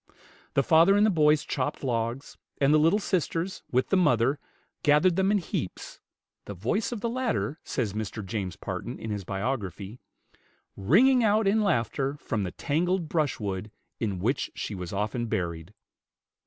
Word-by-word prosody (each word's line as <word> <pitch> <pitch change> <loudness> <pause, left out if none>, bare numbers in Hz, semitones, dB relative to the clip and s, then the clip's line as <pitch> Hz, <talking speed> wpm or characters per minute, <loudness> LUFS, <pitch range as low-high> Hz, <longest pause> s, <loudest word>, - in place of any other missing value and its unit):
The 140 - +4
father 170 +7 +5
and 205 - +5
the 215 - +3
boys 150 -3 +4
chopped 130 0 -3
logs, 120 +1 -2 0.2
and 140 +1 +4
the 155 - +6
little 165 +6 +4
sisters, 185 -2 -2
with 130 +1 +1
the - - +3
mother, 135 -6 +3 0.4
gathered 150 +4 +4
them 190 +1 +2
in 210 - +3
heaps, 155 - -5 0.5
the 100 - -7
voice 130 - -1
of 235 -4 -4
the 235 - -1
latter, 235 - -1
says 110 -7 -2
Mr. 105 -1 -4
James 95 -2 -4
Parton, - - -5
in 110 - -6
his 100 -2 -3
biography, 100 0 -4 0.8
"ringing 230 - +4
out 215 -1 +3
in 215 +3 +3
laughter 140 - 0
from 115 -6 -3
the 90 -3 -3
tangled 170 +3 -1
brushwood 105 - -1 0.3
in 100 -5 -2
which 120 +10 -1
she - - -4
was 90 -3 -6
often 105 +4 -2
buried." 85 -3 -3
135 Hz, 160 wpm, -27 LUFS, -, 0.8 s, the